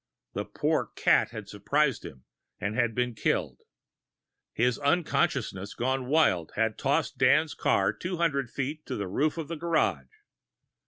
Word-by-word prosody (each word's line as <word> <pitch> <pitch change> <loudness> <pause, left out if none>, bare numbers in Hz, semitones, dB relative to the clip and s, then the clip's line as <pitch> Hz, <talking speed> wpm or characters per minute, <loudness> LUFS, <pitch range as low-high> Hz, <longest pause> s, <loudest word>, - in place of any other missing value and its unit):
The - - -3
poor - - 0
cat - - +3
had 110 -3 -8
surprised 140 +5 0
him, 65 -1 -10 0.4
and 110 +3 0
been 125 -1 0
killed. 105 - -1 0.9
His 125 +1 +1
unconsciousness 140 - 0
gone 130 +1 -1
wild 130 - +2
had 110 0 0
tossed 140 0 0
Dan's 150 +4 +4
car - - +2
two 180 0 -4
hundred 140 -7 0
feet 145 +5 -4
to - - -3
the 100 - -3
roof 150 - 0
of 160 -3 -4
the 165 +1 -5
garage. 165 0 0
135 Hz, 145 wpm, -28 LUFS, 110-155 Hz, 0.9 s, Dan's